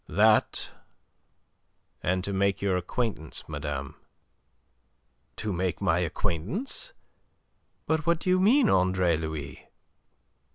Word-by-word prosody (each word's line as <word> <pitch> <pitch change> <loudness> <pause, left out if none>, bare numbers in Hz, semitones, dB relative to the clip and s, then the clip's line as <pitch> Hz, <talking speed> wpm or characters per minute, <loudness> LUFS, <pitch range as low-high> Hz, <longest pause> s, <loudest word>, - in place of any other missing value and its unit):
"That, 110 +5 +3 1.3
and 90 +1 0
to 100 - -3
make 100 +1 +1
your 100 -2 +1
acquaintance, 90 - -2
madame." 75 -2 -5 1.4
"To 110 -2 -3
make 90 0 -1
my - - +2
acquaintance? 165 - -2 0.9
But 160 0 0
what 170 0 +4
do 185 - -1
you 185 - +4
mean, 235 +7 +5
Andre 90 -2 +3
Louis?" 80 -3 -6
95 Hz, 100 wpm, -27 LUFS, 80-125 Hz, 1.4 s, mean